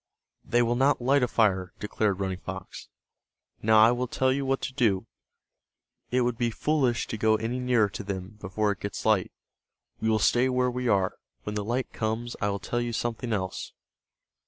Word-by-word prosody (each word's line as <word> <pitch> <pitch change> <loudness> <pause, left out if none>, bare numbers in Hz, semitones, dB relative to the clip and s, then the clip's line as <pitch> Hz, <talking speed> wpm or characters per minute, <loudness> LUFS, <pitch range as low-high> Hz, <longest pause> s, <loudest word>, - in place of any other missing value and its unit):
"They 120 0 +2
will 120 +1 +1
not 135 +3 +3
light 135 +3 +3
a 125 - +3
fire," 95 -6 +1
declared 105 -2 -1
Running 95 -2 -2
Fox. - - -8 0.7
"Now 110 0 +4
I 115 - +5
will 125 +1 -1
tell 130 +2 +1
you 135 0 -2
what 135 0 +1
to 130 - -4
do. 110 -8 +1 1.0
It 125 +1 +2
would 120 -1 0
be 120 -1 +2
foolish 130 -1 +1
to 110 - -5
go 110 0 +4
any 115 +3 -2
nearer 125 -4 +3
to 100 - -6
them, 100 +1 -6
before 105 +2 0
it 100 - -5
gets 100 - -5
light. 105 -4 +2 0.7
We 110 - 0
will 110 - +3
stay 120 +4 +3
where 125 0 +1
we 125 0 -2
are. 95 -4 +2 0.3
When 105 - -4
the 105 -1 -2
light 120 +4 -2
comes 115 +2 -2
I 105 - +1
will 100 - -1
tell 120 +5 -2
you 120 -1 -3
something 120 +1 -2
else." 95 -3 -3
115 Hz, 195 wpm, -27 LUFS, 105-125 Hz, 1.0 s, I